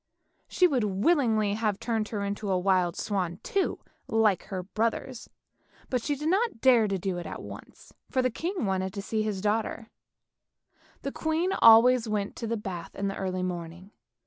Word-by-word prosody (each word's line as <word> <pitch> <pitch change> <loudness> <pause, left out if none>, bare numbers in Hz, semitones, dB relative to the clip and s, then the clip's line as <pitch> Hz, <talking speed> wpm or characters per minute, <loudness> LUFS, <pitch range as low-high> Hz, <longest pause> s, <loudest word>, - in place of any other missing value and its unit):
She 365 - +3
would 270 -9 +2
willingly 215 - +2
have 210 -2 -1
turned 225 -2 -1
her 205 -2 -3
into 200 +1 -3
a 185 - +2
wild 180 -2 +2
swan 180 -4 -2
too, 395 - 0 0.3
like 220 -5 +2
her 185 -3 -5
brothers, 225 +5 -3 0.6
but 250 -2 +1
she 290 +5 -1
did 300 +3 -4
not 390 - +1
dare 240 -3 +5
to 195 -1 -1
do 185 -1 -3
it 170 - -6
at - - -6
once, - - -12 0.2
for 260 - +1
the 255 - +1
king 345 - -3
wanted 190 -1 -1
to 200 - -4
see 220 +1 -1
his 210 -3 -2
daughter. 220 +2 -1 1.1
The 275 - -3
queen 320 +5 -1
always 230 +1 +6
went 205 -2 -2
to 230 - -4
the 230 +1 -1
bath 185 -5 -7
in 200 0 -2
the 195 - -4
early 185 -1 -2
morning. 175 +1 -6
215 Hz, 180 wpm, -28 LUFS, 190-245 Hz, 1.1 s, always